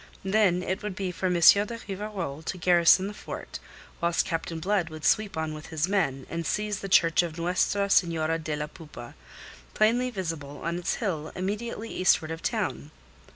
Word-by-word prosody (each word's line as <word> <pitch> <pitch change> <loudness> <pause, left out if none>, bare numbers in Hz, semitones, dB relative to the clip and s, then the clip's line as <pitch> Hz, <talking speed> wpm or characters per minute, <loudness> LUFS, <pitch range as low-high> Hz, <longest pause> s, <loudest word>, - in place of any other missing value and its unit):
Then 190 -3 +3
it 185 +1 -2
would 210 -3 -4
be 190 -1 -3
for 185 +1 -2
M. 180 - +1
de 200 +7 +5
Rivarol 195 -7 -5
to 185 - -3
garrison 175 +1 +5
the 205 - -5
fort, - - -8 0.4
whilst 170 0 +1
Captain 165 0 -3
Blood 185 -1 0
would 155 -1 -8
sweep 215 -5 +2
on 160 -1 -2
with 155 0 -9
his 160 0 -1
men, 160 -10 0
and 170 0 -4
seize 210 +4 -1
the 195 - -6
Church 165 -3 +5
of 170 -2 -5
Nuestra 185 +4 +1
Senora 165 -4 +2
de 155 -1 -3
la 150 0 -3
Poupa, 150 -6 -11 0.6
plainly 240 +4 +3
visible 165 - -5
on 170 +1 -2
its 175 - -1
hill 165 -9 -3
immediately 210 +4 -4
eastward 165 -3 +2
of 165 0 -5
the - - +1
town. 70 +3 -3
175 Hz, 185 wpm, -27 LUFS, 160-200 Hz, 0.6 s, de